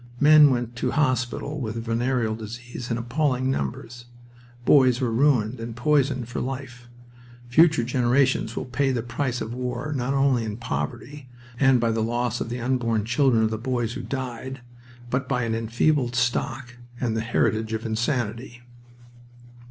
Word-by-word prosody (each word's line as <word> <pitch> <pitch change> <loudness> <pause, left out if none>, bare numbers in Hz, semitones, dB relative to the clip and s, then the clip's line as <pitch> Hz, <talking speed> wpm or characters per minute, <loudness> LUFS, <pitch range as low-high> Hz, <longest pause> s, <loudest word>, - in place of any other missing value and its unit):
Men 150 0 +8
went 120 -2 -2
to - - -1
hospital 130 +1 -1
with 110 -2 -4
venereal 115 -1 0
disease 120 +2 -7
in 115 - -1
appalling 130 +2 0
numbers. 120 - -4 0.6
Boys 130 -3 +5
were 125 -4 0
ruined 125 -2 +2
and 115 0 -6
poisoned 135 -2 +1
for 125 - -4
life. 125 -2 -6 0.6
Future 155 0 +5
generations 125 -1 +1
will - - -3
pay 135 +2 0
the 120 -3 -1
price 120 +1 -2
of 110 +1 -4
war 125 +4 -3
not 135 +1 -1
only 135 -3 +2
in 110 -1 -4
poverty 120 - -5 0.3
and 135 -2 +5
by 115 -1 +1
the 110 0 -1
loss 120 +1 -1
of - - -3
the 120 +1 -4
unborn 115 -3 0
children 120 -1 +3
of 110 - +1
the 110 - -3
boys 120 -2 -2
who - - -5
died, 130 0 -5 0.5
but 130 +1 -1
by 125 -3 0
an 115 -1 -1
enfeebled 120 +3 +1
stock 125 +1 -1 0.2
and 115 -3 -1
the 110 - 0
heritage 110 -1 0
of 110 +1 -3
insanity. 120 +1 -2
125 Hz, 160 wpm, -24 LUFS, 115-130 Hz, 0.6 s, Men